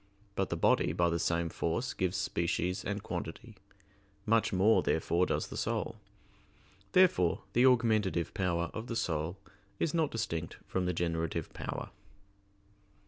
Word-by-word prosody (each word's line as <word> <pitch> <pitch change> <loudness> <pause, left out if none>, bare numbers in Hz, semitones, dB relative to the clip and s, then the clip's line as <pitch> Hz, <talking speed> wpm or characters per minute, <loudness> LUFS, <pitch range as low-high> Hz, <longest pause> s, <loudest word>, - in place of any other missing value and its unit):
But 95 -1 -1
the - - -2
body - - +3
by 85 -1 +2
the 85 - 0
same 85 0 0
force 100 +11 -2
gives 95 -1 -1
species 85 +2 -1
and 100 0 -3
quantity; - - -6 0.7
much 115 +1 +3
more, 100 +3 +4
therefore, 85 +2 +1
does - - -1
the - - -6
soul. - - -2 1.0
Therefore 130 - +4
the 125 +2 +6
augmentative 110 -9 +2
power 85 -2 0
of 110 +2 -5
the 115 - -3
soul 80 -2 -1 0.4
is 155 - 0
not 160 -3 +2
distinct 85 - -3
from 95 -1 -1
the 90 - +1
generative 85 -1 -2
power. - - -5
90 Hz, 140 wpm, -32 LUFS, 85-110 Hz, 1.0 s, the